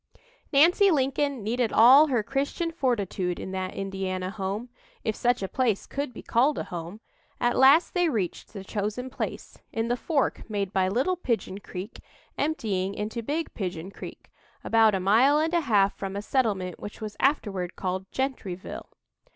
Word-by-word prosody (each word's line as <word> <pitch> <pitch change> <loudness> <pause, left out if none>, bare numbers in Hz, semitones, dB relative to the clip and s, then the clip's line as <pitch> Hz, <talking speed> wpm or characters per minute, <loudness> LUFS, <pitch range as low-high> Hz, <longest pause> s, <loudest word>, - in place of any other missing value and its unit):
Nancy 345 +8 +5
Lincoln 275 - 0
needed 230 +2 0
all 265 +7 +8
her 245 -6 +1
Christian 280 - -2
fortitude 205 - -1
in 190 - -6
that 185 -1 -4
Indiana 190 -1 -3
home 205 +3 -4 0.3
if 220 -3 -1
such 245 -4 +1
a - - -1
place 230 -2 0
could 280 -1 -4
be - - -10
called 265 +6 +2
a - - -2
home. 175 +5 -7 0.4
At 240 0 +1
last 275 +6 +6
they 355 -2 +2
reached 205 - -3
the 200 -3 -8
chosen 215 +6 -3
place, - - -5
in 225 +1 -2
the 245 - +2
"fork" 275 -2 -1
made 200 -2 -2
by 190 -1 +2
Little 260 - 0
Pigeon 225 - -2
Creek 195 +2 -8 0.4
emptying 200 -11 -1
into 220 +3 -3
Big 300 +7 -3
Pigeon 185 -2 -4
Creek, - - -10 0.3
about 225 -2 +4
a - - 0
mile 230 +10 +4
and 320 +2 0
a 340 - +3
half 205 -8 +3
from 195 -1 -5
a 200 - -4
settlement 205 -9 0
which 205 - -8
was 215 -2 -6
afterward 200 - 0
called 190 0 -4
Gentryville. 245 -9 -4
220 Hz, 165 wpm, -26 LUFS, 195-270 Hz, 0.4 s, all